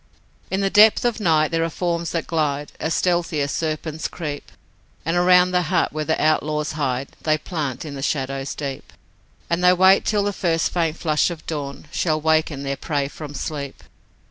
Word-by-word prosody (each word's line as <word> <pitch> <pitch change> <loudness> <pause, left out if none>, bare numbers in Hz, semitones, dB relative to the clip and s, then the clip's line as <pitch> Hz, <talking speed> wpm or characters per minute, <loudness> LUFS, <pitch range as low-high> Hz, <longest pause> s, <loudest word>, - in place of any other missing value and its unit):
In 190 +1 -1
the 195 0 +1
depth 215 +3 +6
of 240 -1 0
night 160 -5 +2
there 165 0 +1
are 165 - 0
forms 170 0 -2
that 165 - -2
glide 150 -3 -1
As 160 - -1
stealthy 175 -3 +1
as 140 0 -1
serpents 155 0 -3
creep, 150 -4 -6 0.5
And 165 +2 0
around 180 +1 +5
the 180 0 +2
hut - - +1
where 155 0 -2
the 160 - 0
outlaws 155 0 +1
hide 135 -3 -2
They 155 -1 +2
plant 155 -4 -4
in 150 - -6
the 135 - -6
shadows 135 -1 -2
deep, 140 -2 -6 0.5
And 170 +1 -1
they 180 0 +7
wait 190 +2 +5
till 205 -1 +1
the 205 0 -1
first 165 -4 0
faint 165 -2 0
flush 155 -1 +1
of 170 -3 -8
dawn 145 -2 -5
Shall 155 -3 0
waken 155 -2 +1
their 140 0 -3
prey 145 -3 -2
from 150 -1 -9
sleep. 140 -3 -5
155 Hz, 190 wpm, -22 LUFS, 145-175 Hz, 0.5 s, they